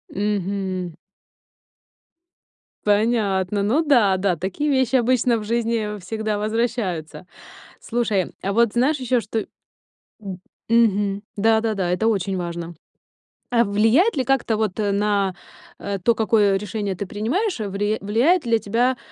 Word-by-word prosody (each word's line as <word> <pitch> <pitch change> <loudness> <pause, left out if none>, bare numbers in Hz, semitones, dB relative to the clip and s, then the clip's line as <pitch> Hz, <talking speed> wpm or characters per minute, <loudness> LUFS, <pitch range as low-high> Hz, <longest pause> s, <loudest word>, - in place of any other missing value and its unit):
Мгм. 195 -3 -2 1.9
Понятно, 205 -2 +1
ну 240 +10 +2
да, 235 -11 +4
да, 185 -2 +1
такие 195 - -2
вещи 260 -2 +2
обычно 245 -1 +2
в 215 - -5
жизни 225 -2 -1
всегда 215 +3 -3
возвращаются. 215 -7 -2 0.5
Слушай, 220 -6 -1
а, 195 - -2
вот, 235 0 +3
знаешь 270 +5 +2
ещё 255 -1 +1
что 220 0 -3 1.3
М, 235 0 +6
мгм, 200 -1 0
да-да-да, 220 -3 +1
это 180 +5 0
очень 195 -3 0
важно. 170 -1 -5 0.8
А 235 -1 +4
влияет 225 - +3
ли 260 - +2
как-то 265 -5 +1
вот, 215 -2 -2
э, 205 -1 0
на, 200 -1 +1 0.5
э, 200 -1 -3
то, 235 +7 +3
какое 210 -3 +3
решение 205 0 -3
ты 195 +2 -5
принимаешь, 260 - -1
вли 205 +2 -1
влияет 245 - +2
ли 230 -1 +2
тебя, 240 +5 0
210 Hz, 130 wpm, -22 LUFS, 195-235 Hz, 1.9 s, М